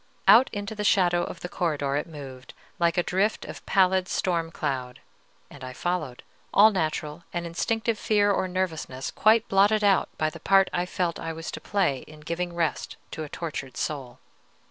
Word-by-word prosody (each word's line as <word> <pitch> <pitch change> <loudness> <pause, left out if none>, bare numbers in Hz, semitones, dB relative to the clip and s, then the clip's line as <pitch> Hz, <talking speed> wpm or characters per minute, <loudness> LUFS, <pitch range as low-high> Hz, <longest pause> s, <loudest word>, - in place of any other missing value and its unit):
Out 245 +5 +8
into 205 +1 -4
the 210 -1 -4
shadow 175 -4 +3
of 170 - -7
the - - -4
corridor 145 -6 -1
it 145 - -1
moved, 135 -5 -10 0.2
like 170 0 +2
a 175 - +3
drift 195 +5 0
of - - -9
pallid 190 -1 +3
storm 170 -3 -1
cloud, 130 -6 -4 0.5
and 140 - -13
I 130 0 -6
followed, 155 -5 -3 0.3
all 215 +2 +7
natural 155 -3 -2
and 175 -1 -3
instinctive 225 +6 -1
fear 205 -1 +3
or 190 - 0
nervousness 165 -8 -3
quite 220 +2 +3
blotted 205 +2 +3
out 200 -2 +3
by 155 0 0
the - - -10
part 195 -1 +4
I 175 0 0
felt 175 -2 -2
I 165 0 -4
was 165 +1 -6
to - - -7
play 195 -10 0
in 155 0 -13
giving 170 +2 -3
rest 165 -3 -2
to 155 - -5
a 150 - -7
tortured 140 -6 -6
soul. 130 -5 -4
175 Hz, 185 wpm, -26 LUFS, 150-195 Hz, 0.5 s, Out